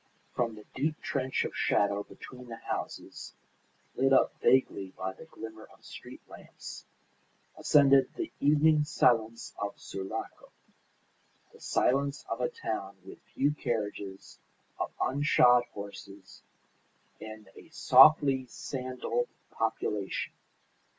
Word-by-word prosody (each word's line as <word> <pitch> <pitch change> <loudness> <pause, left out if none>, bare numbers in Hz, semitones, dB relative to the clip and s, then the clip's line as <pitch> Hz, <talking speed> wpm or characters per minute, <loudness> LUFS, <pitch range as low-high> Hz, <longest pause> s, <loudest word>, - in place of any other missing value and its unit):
From 115 -3 -1
the 105 - -13
deep 150 +3 -1
trench 130 -1 -1
of - - -5
shadow 100 0 +2
between 125 +4 -12
the 115 - -7
houses, - - -6 0.6
lit 135 +1 +2
up 135 - +4
vaguely 100 -7 +2
by 95 0 -3
the 160 - -13
glimmer 110 -8 -10
of - - -21
street - - -11
lamps, - - -11 0.7
ascended 135 -2 +5
the 345 -3 -4
evening 150 +1 +4
silence 115 -7 +1
of 100 0 -4
Sulaco; 95 0 -6 1.0
the - - -17
silence 140 +2 0
of 115 - -3
a 125 - +1
town 100 -3 -5
with 95 - -11 0.2
few 145 +2 +3
carriages, 105 -8 -4 0.4
of - - -1
unshod 125 -3 +4
horses, 100 -1 -10 0.8
and 110 -1 -10
a - - -14
softly 135 -1 +6
sandalled 130 - -3 0.2
population. - - -2
125 Hz, 115 wpm, -30 LUFS, 105-140 Hz, 1.0 s, softly